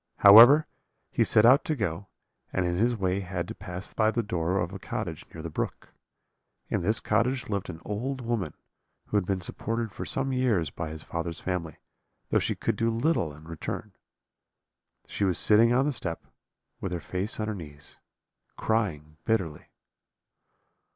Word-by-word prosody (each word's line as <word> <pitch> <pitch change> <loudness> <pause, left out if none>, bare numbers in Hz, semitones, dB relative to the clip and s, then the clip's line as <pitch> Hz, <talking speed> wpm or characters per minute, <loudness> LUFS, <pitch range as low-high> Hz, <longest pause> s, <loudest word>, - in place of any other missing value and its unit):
However, 120 +10 +9 0.5
he - - +2
set 110 - +4
out 130 +5 +6
to 155 - 0
go, 100 - -3 0.4
and 95 - 0
in 85 0 0
his 120 +6 +2
way 95 -2 0
had 90 -2 -4
to - - -4
pass 90 -1 -8
by 110 -1 +3
the 115 +1 -1
door 90 -2 -1
of 90 0 -2
a 95 - -6
cottage - - -5
near 80 - -9
the 85 - -4
brook. - - -5 0.8
In - - 0
this 110 +6 +1
cottage 125 +1 0
lived 100 -3 -2
an 80 -3 -7
old 125 +6 -3
woman, 115 - -3 0.5
who 105 - +1
had 95 -3 0
been 95 -2 -1
supported 115 +5 -2
for - - -6
some 135 0 -1
years 110 - +1
by 80 +2 -5
his 80 -1 -8
father's 85 0 -4
family, 90 -3 -4 0.5
though - - +4
she - - -1
could - - -2
do 115 - +1
little 115 - 0
in 75 +1 -14
return. 80 -2 -6 1.1
She - - -4
was 95 -4 +2
sitting 110 +2 +6
on 130 +3 +3
the 150 - +1
step, 85 -10 -4 0.5
with 95 -2 -4
her 90 - -2
face 95 +6 -3
on 110 - -1
her 110 - -2
knees, 75 -6 -10 0.6
crying 80 -9 -1
bitterly. 95 -10 -1
100 Hz, 175 wpm, -27 LUFS, 85-115 Hz, 1.1 s, However